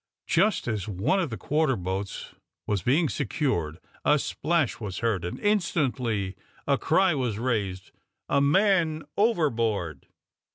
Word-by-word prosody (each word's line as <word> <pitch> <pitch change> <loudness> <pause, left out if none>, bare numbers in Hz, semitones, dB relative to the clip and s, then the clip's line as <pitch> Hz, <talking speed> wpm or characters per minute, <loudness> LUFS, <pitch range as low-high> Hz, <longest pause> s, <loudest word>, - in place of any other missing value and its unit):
Just 215 - +2
as 110 -4 -2
one 105 - +1
of 170 -5 -1
the 115 - -5
quarter 150 - +1
boats 95 +1 -4 0.3
was 100 -3 0
being 145 - +3
secured, 85 - -1 0.3
a 150 - +4
splash 155 -1 0
was 100 -5 -5
heard, 105 -6 +1
and 90 - -4
instantly 130 - 0 0.3
the 140 -1 +2
cry 185 +2 +3
was 125 -7 -1
raised 105 -6 -2 0.4
of 140 - +1
"A - - +4
man 165 0 +3
overboard!" 115 - 0
125 Hz, 135 wpm, -27 LUFS, 100-160 Hz, 0.4 s, a